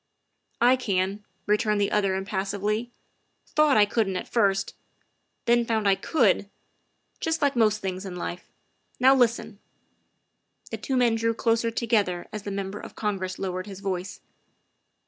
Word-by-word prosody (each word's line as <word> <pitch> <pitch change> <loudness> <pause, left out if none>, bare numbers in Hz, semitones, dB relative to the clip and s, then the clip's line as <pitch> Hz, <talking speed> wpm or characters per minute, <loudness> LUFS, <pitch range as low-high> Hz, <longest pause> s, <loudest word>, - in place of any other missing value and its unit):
' - - -51
' - - -51
" - - -43
I - - +2
can," 200 -3 -1 0.2
returned 210 0 +2
the 200 - +1
other 195 -2 +1
impassively; 200 +3 -2 0.3
" - - -47
thought 305 -4 +5
I 210 - +7
couldn't 205 -3 0
at - - -5
first, 195 -4 +1 0.7
then 240 0 +4
found 220 -3 0
I 195 - +6
could 205 - +1 0.7
just 325 0 -1
like 280 -1 +2
most 215 -3 +3
things 190 0 -4
in 190 -2 -6
life. 175 0 -6 0.5
Now 260 +2 +7
listen." 235 -5 +1 1.1
The - - -3
two 265 - -2
men 240 -2 +4
drew 230 0 0
closer 230 0 +1
together 215 -6 0
as 215 - -4
the 205 - -6
Member 195 +1 -4
of - - -10
Congress 190 -3 -3
lowered 185 0 -4
his 195 -2 -8
voice. 190 -1 -4
210 Hz, 165 wpm, -26 LUFS, 195-230 Hz, 1.1 s, I